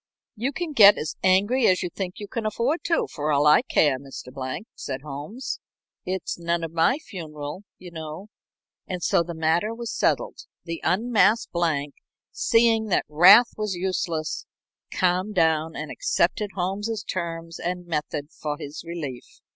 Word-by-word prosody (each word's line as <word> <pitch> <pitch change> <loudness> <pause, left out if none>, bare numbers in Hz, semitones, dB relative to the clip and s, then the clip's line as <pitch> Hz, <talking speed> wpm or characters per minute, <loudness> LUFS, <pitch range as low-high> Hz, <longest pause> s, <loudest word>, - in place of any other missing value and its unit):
"You 240 +5 -1
can 330 +3 -4
get 205 -5 +8
as 155 - -3
angry 205 +7 +3
as 185 0 +3
you 180 - -3
think 185 0 -5
you 205 - -7
can 230 0 -4
afford 235 +10 -1
to, 335 - +2
for 150 0 -1
all 145 0 +3
I 150 +1 +7
care, 145 -4 +2
Mr. 135 -2 -10
Blank," 130 +9 -5
said 130 -1 -5
Holmes. 150 - -6 0.5
"It's 185 -1 -3
none 170 0 -1
of 165 - -4
my 165 - +3
funeral, 165 - -8
you 180 -1 -11
know." 160 +4 -8 0.6
And 180 -2 -4
so - - +3
the 170 0 -5
matter 165 +7 +1
was 235 -1 -5
settled. - - 0 0.2
The 165 -1 -5
unmasked 225 +3 +2
Blank, 155 -5 0 0.4
seeing 230 -1 +3
that 195 - +1
wrath 180 +10 +7
was 210 -3 -2
useless, 175 -3 -2 0.4
calmed 185 +3 0
down 160 -2 +2
and - - -5
accepted 215 - 0
Holmes's 205 +4 -2
terms 165 -2 -5
and 180 0 -3
method 150 -2 -3
for 150 -1 -4
his 150 -1 -8
relief. 160 -7 -7
175 Hz, 160 wpm, -25 LUFS, 155-210 Hz, 0.6 s, get